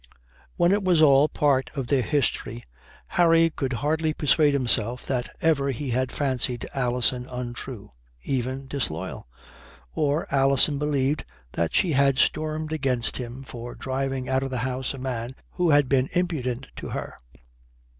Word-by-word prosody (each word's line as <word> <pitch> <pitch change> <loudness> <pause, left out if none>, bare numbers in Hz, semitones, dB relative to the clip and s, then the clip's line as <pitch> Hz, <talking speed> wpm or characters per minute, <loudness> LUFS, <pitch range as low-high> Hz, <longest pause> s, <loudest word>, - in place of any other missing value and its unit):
When 175 - +3
it 200 0 +2
was 180 -3 +3
all 145 -1 +6
part 140 -3 +1
of 135 -3 -2
their 135 +1 +2
history, 120 -4 -1 0.4
Harry 165 -1 +4
could 135 -4 -3
hardly 155 0 +1
persuade 150 0 +3
himself 120 -2 +1
that 125 -2 -2
ever 145 -4 +2
he 135 0 -3
had 130 +2 0
fancied 130 -3 0
Alison 125 -1 0
untrue, 120 -3 -6 0.3
even 130 - -2
disloyal; 125 - -4 0.7
or 150 +2 0
Alison 140 +1 +3
believe 145 -1 +1 0.3
that 85 -1 -1
she 180 - +3
had 140 -1 +3
stormed 155 +1 0
against 130 -6 -1
him 125 +1 -6
for 120 -2 -8
driving 135 -1 -3
out 130 0 +1
of 135 - -3
the 130 - -3
house 130 +1 -3
a - - -9
man 125 -1 -4 0.2
who 180 -2 0
had 145 -2 +5
been 130 0 +2
impudent 140 -8 -1
to - - -6
her. - - -5
135 Hz, 150 wpm, -25 LUFS, 125-150 Hz, 0.7 s, all